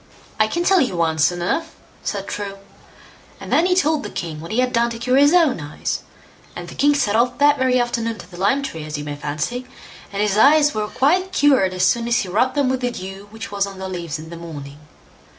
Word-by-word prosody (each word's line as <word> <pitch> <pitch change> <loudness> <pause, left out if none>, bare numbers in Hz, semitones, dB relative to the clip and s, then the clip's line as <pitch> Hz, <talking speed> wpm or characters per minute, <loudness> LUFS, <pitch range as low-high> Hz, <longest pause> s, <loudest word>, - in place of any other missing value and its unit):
"I 215 - +4
can 345 +10 -1
tell 380 0 +4
you 235 -9 -1
one 160 -1 0
soon 175 +3 +2
enough", 320 - -2 0.3
said 200 -1 -3
True; 200 -1 -5 0.8
and - - -5
then 340 - +4
he 360 - +2
told 315 -4 +2
the - - -6
king 155 -3 -5
what 165 - -8
he 220 - -2
had 250 0 +1
done 235 0 +2
to 230 - -6
cure 250 +2 0
his 285 +1 +6
own 330 - +4
eyes, 145 0 -4 0.6
and - - -7
the - - -9
king 290 +1 +3
set 215 -7 +1
off 245 +2 +2
that 290 0 +4
very 255 -1 +3
afternoon 230 -2 -1
to 180 - -13
the - - -11
lime 235 +10 +1
tree, 165 - -5
as 150 0 -5
you 145 - -5
may 145 0 -5
fancy, 150 +13 -4 0.4
and 200 - -4
his 210 0 +1
eyes 295 +3 +5
were 215 -1 -2
quite 360 - +1
cured 270 - +3
as 185 0 +2
soon 235 +3 +1
as 235 -1 +2
he 195 - -1
rubbed 250 +8 +1
them 285 -2 +2
with 260 0 0
the 245 - 0
dew 195 -3 -8
which 220 0 -8
was 200 -1 0
on 195 -1 -9
the 190 0 -5
leaves 170 -4 -4
in 160 +1 -10
the 170 - -7
morning. 145 -4 -9
225 Hz, 245 wpm, -21 LUFS, 180-270 Hz, 0.8 s, his